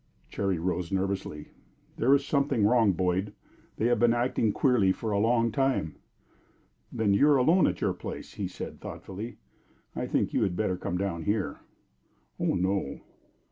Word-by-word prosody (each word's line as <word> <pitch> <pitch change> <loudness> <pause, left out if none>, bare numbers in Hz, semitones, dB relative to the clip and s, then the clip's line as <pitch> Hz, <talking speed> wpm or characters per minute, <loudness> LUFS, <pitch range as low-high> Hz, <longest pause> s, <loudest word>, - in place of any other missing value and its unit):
Cherry 95 -3 -1
rose 90 +1 -2
nervously. 95 -5 -3 0.5
"There 135 +4 +5
is 140 0 0
something 140 -7 +1
wrong, 115 -2 +4
Boyd. 95 +3 -1 0.4
They 110 - 0
have 120 0 +2
been 120 0 +4
acting 120 -2 +1
queerly 115 -6 +3
for 110 +3 -3
a 100 - +1
long 115 +1 +2
time." 130 - 0 1.0
"Then 105 -3 +1
you 140 +9 +4
are 145 - +5
alone 165 +8 +4
at - - -2
your - - +1
place," - - -8
he - - -3
said, - - -8
thoughtfully. 105 +5 -7 0.6
"I - - -3
think - - 0
you - - +1
had 90 - 0
better 100 -2 0
come 90 0 -3
down 85 -4 -3
here." 105 -1 -1 0.8
"Oh - - +1
no!" 95 -5 -1
105 Hz, 165 wpm, -28 LUFS, 95-120 Hz, 1.0 s, There